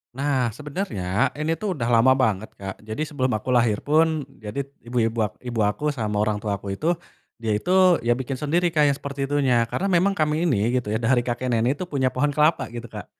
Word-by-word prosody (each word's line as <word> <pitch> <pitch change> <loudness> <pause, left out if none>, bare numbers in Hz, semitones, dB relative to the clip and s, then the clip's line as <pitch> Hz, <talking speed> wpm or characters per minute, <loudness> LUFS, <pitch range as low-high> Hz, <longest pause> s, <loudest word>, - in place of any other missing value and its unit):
Nah, 135 -3 +1
sebenernya 135 - -1
ini 155 +2 -1
tuh 200 -4 -2
udah 120 -5 -2
lama 120 +3 +6
banget 110 -5 0
Kak 95 -1 -7
jadi 110 +7 -6
sebelum 135 -5 -1
aku 110 +4 -4
lahir 115 -4 +2
pun 155 0 +2 0.2
jadi 110 +6 -4 0.2
ibu-ibu 115 -1 0
ak 100 - -17
ibu 120 -2 -4
aku 105 - -3
sama 110 -6 -3
orang 105 -1 0
tua 105 -1 -2
aku 100 0 -6
itu, 165 - 0 0.5
dia 110 -2 -1
itu 180 - -3 0.3
ya 120 0 +1
bikin 130 0 -4
sendiri 170 +3 +1
Kak 150 -2 +3
yang 140 - +2
seperti 140 -1 -4
itunya 130 -5 +2
karena 195 +10 -2
memang 185 +3 +3
kami 155 +2 +1
ini 115 -5 +1
gitu 120 - -10
ya - - +2
dari 120 +2 +2
kakek 120 +1 -2
nenek 120 +4 +2
tuh 180 - -8
punya 130 -3 +1
pohon 145 +3 0
kelapa 150 -2 +2
gitu 120 0 -7
Kak, - - -8
130 Hz, 215 wpm, -24 LUFS, 115-150 Hz, 0.5 s, lama